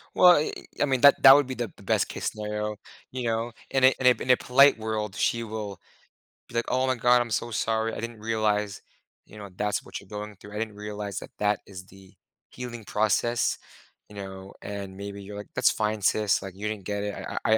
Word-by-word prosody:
Well, 180 -1 +8
eh, 150 - 0 0.3
I - - +5
mean, 130 -3 0
that 140 0 +7
that 135 - +12
would 145 -2 +3
be 130 - -4
the 120 -4 -4
the - - -17
best - - +1
case - - -3
scenario, 105 0 -4 0.4
you 130 -1 -4
know? 115 0 -1 0.2
In 135 -1 +1
a 130 0 +7
in 130 - -2
a 125 - +4
in - - -5
a 125 - +7
polite 135 +2 +5
world, 110 -2 -3
she 115 0 0
will 105 -4 -6 0.7
be, 120 - -12
like, 115 - +1
"Oh 130 +1 +1
my 130 - +2
god. 125 +1 +4
I'm 120 - -3
so 115 +2 -2
sorry. 110 +1 0
I - - -5
didn't 115 -1 -6
realize," 105 -2 -1 0.5
you 105 - -14
know," 100 -2 -8
that's 105 +2 -1
what - - -7
you're 100 - -17
going 105 0 -6
through. 105 +2 -12
I 105 - -3
didn't 110 -2 -4
realize 105 -1 -5
that - - -10
that 105 0 +1
is 95 -2 -10
the 95 0 -17 0.4
healing 120 -2 -7
process." 110 +3 +1 0.5
You 105 - -13
know? 95 0 -8
And 100 -2 -6
maybe 100 0 -7
you're 100 +1 -8
like, 105 - -8
"that's - - +4
fine, 105 -1 -1
sis. 105 +1 +2
Like, 95 -1 -7
you 105 +2 -4
didn't 105 -3 -5
get 100 0 -2
it. 105 0 -3
I - - -6
I 110 0 +5
105 Hz, 230 wpm, -26 LUFS, 105-120 Hz, 0.7 s, that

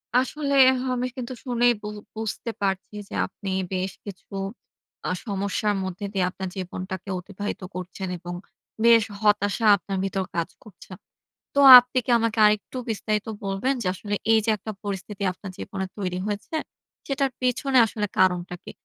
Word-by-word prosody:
আসলে 280 +3 +1 0.3
আমি 255 -1 -1
কিন্তু 255 0 -4
শুনেই 245 -1 +3
বু 210 - -6 0.3
বুঝতে 220 +2 -3
পারছি 195 +1 -1
যে, - - -10
আপনি 195 +1 -8 0.2
বেশ 185 +1 -1
কিছু 200 -1 -9 0.7
আ - - 0
সমস্যার 200 0 -1
মধ্যে 190 +2 -5
দিয়ে 190 -2 +2
আপনার 190 0 -5
জীবনটাকে 185 +1 -5
অতিবাহিত 200 +3 -6
করছেন, 185 +1 -5
এবং 175 +1 -7 0.5
বেশ 230 -2 +7 0.2
হতাশা 210 +1 +2
আপনার 195 0 -5
ভিতর 195 0 -1
কাজ 170 -1 -1
করছে। 200 -2 -15 0.6
তো - - 0 0.2
আপনি 250 +1 +1
কি - - -3
আমাকে 230 -1 -1
আরেকটু 210 +4 0
বিস্তারিত 215 -1 -1 0.2
বলবেন, 195 +8 0
যে - - -5
আসলে 205 +2 -4 0.2
এই 225 - +6
যে - - +3
একটা 215 +2 -6
পরিস্থিতি 200 0 -5
আপনার 190 +1 -9
জীবনে 190 -1 -4
তৈরি 180 -2 -2
হয়েছে, 210 +8 -4 0.5
সেটার 275 -1 0
পেছনে 255 +1 +2
আসলে 210 -1 -2
কারণটা 180 -1 +2
কি? - - -8
205 Hz, 155 wpm, -25 LUFS, 190-230 Hz, 0.7 s, বেশ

